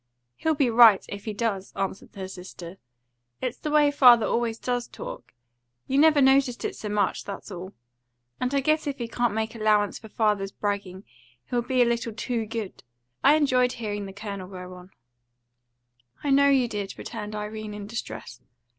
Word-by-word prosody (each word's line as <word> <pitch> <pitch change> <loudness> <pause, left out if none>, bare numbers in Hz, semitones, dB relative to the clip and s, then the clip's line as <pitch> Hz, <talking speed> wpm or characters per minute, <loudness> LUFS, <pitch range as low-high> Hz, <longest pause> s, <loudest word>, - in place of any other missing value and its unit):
"He'll 320 -1 0
be 275 -5 +2
right 225 -3 +7
if 200 0 -7
he 215 - -3
does," 200 -4 -2
answered 195 0 -4
her 190 -1 -5
sister. 180 -1 -10 0.6
"It's 255 -1 -3
the 305 - -3
way 295 -1 +4
father 245 -5 +7
always 230 -1 0
does 245 0 -2
talk. - - -9 0.5
You 270 - +1
never 300 -2 +6
noticed 265 -2 +3
it - - -3
so 210 - -6
much, 205 -2 0
that's 200 +1 -8
all. 185 +1 -7 0.7
And 250 0 -1
I 275 - +3
guess 310 +2 +1
if 280 - -2
he 235 - -4
can't 235 -2 0
make 220 0 -2
allowance 215 -2 +1
for 220 - -12
father's 210 -3 0
bragging, 200 -2 -3 0.5
he'll 245 -1 +1
be 250 +1 +2
a - - +2
little 235 -1 -1
too 230 0 -3
good. 225 -3 -6 0.4
I 290 - +7
enjoyed 255 -4 +3
hearing 205 -3 -4
the - - -8
Colonel 200 -2 -6
go 180 -1 -9
on." 180 0 -13 1.3
"I 285 - 0
know 280 +1 +5
you 265 -3 +3
did," 205 -3 -5
returned 210 0 -6
Irene 210 0 -5
in 205 -1 -7
distress. 205 - -7
225 Hz, 180 wpm, -26 LUFS, 200-250 Hz, 1.3 s, right